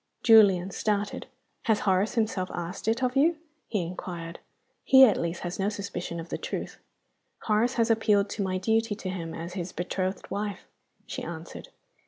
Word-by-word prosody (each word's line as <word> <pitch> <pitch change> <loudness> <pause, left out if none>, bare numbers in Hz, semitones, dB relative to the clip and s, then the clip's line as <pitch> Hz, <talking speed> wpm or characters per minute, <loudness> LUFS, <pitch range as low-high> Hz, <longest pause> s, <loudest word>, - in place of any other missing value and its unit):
Julian 195 -5 +6
started. 205 +1 -2 0.4
"Has 220 -2 +2
Horace 190 +2 +1
himself 215 -5 0
asked 175 +4 -5
it 225 +4 +1
of 250 +1 0
you?" 315 +4 +4 0.3
he 205 -5 -1
inquired. 170 -1 -6 0.4
"He, 265 0 +8
at 215 - +3
least, 170 +1 -3
has 175 +1 -5
no 195 +1 +1
suspicion 195 -5 -5
of 165 - -8
the - - -3
truth." - - -5 0.6
"Horace 225 +4 +2
has 230 -1 +2
appealed 210 -2 +3
to 215 - -3
my 185 -1 0
duty 220 +3 +1
to 200 -2 -6
him 165 -3 -5
as 170 +2 -6
his 180 -2 -4
betrothed 185 +1 -3
wife," 205 -1 -3 0.4
she - - -6
answered. - - -8
200 Hz, 170 wpm, -27 LUFS, 180-220 Hz, 0.6 s, He